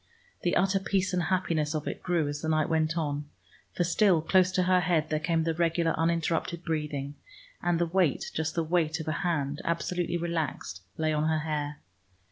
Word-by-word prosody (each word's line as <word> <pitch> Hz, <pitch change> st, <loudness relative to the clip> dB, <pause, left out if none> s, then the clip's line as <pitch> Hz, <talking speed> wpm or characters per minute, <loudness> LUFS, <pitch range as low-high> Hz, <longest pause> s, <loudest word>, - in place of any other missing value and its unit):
The 175 Hz, -, +1 dB
utter 195 Hz, +1 st, +3 dB
peace 190 Hz, -1 st, 0 dB
and 180 Hz, -, +2 dB
happiness 165 Hz, -3 st, 0 dB
of 155 Hz, -, -3 dB
it -, -, -4 dB
grew 170 Hz, -4 st, +1 dB
as 145 Hz, 0 st, -4 dB
the 160 Hz, -, -2 dB
night 155 Hz, -1 st, +2 dB
went 160 Hz, 0 st, +1 dB
on, 145 Hz, -2 st, -1 dB, 0.5 s
for 175 Hz, -, +2 dB
still 180 Hz, +1 st, +4 dB
close 185 Hz, +3 st, +3 dB
to 185 Hz, -, +2 dB
her 185 Hz, 0 st, +4 dB
head 165 Hz, -3 st, +1 dB
there 155 Hz, -, +1 dB
came 165 Hz, 0 st, +1 dB
the 165 Hz, 0 st, 0 dB
regular 165 Hz, 0 st, +1 dB
uninterrupted 165 Hz, +1 st, 0 dB
breathing, 150 Hz, -4 st, -2 dB, 0.5 s
and 175 Hz, -1 st, +1 dB
the 170 Hz, -, +2 dB
weight, 170 Hz, -4 st, +1 dB
just 160 Hz, +1 st, -2 dB
the 165 Hz, -, +1 dB
weight 160 Hz, -1 st, +1 dB
of 160 Hz, -, -6 dB
a -, -, +1 dB
hand 150 Hz, -5 st, -1 dB
absolutely 175 Hz, +1 st, -1 dB
relaxed, 160 Hz, -, -3 dB, 0.2 s
lay 155 Hz, -1 st, +1 dB
on 155 Hz, +1 st, +1 dB
her 155 Hz, -1 st, +1 dB
hair. 150 Hz, -1 st, -3 dB
165 Hz, 195 wpm, -28 LUFS, 155-175 Hz, 0.5 s, still